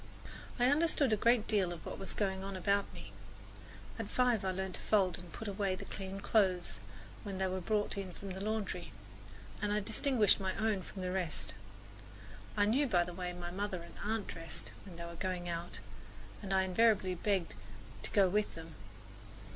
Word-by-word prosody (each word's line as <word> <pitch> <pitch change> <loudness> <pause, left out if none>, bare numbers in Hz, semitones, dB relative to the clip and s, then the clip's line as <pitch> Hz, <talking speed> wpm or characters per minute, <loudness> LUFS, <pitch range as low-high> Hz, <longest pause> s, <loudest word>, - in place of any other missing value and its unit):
I 245 - +5
understood 290 -5 +3
a - - +6
good 230 +1 +4
deal 200 -5 +2
of 170 - -7
what - - -5
was 195 - -3
going 190 -2 -1
on 195 0 -4
about 200 +2 +1
me. - - -10 0.9
At - - -3
five 245 -5 +3
I 190 - +1
learned 190 0 -2
to - - -2
fold 190 -5 +3
and 175 -2 -11
put 220 - -6
away 200 -1 0
the - - -7
clean 195 0 -5
clothes 190 -5 +2 0.4
when 200 -3 -5
they 190 - +1
were 185 0 -1
brought 205 +1 0
in 190 -2 -4
from 195 +2 -7
the 190 +1 -5
laundry, 215 0 -2 0.7
and 205 -1 +1
I 210 - +3
distinguished 225 +1 +3
my 190 -1 -1
own 220 -3 +1
from 185 +1 -7
the 180 - -1
rest. 180 -5 -2 1.0
I 205 - +5
knew 265 +7 +3
by 180 -7 +4
the 175 0 -6
way 180 0 -3
my 175 0 -5
mother 190 -2 -2
and 170 - -12
aunt 215 0 0
dressed 165 -1 -6
when 185 -3 -10
they 170 0 -6
were 170 - -7
going 180 0 -2
out, 170 0 -4 0.6
and 195 -2 -5
I 190 0 +4
invariably 190 -1 +4
begged 185 -1 0 0.5
to - - -2
go 200 -2 +5
with 210 +3 +1
them. 165 0 -9
195 Hz, 195 wpm, -34 LUFS, 180-210 Hz, 1.0 s, a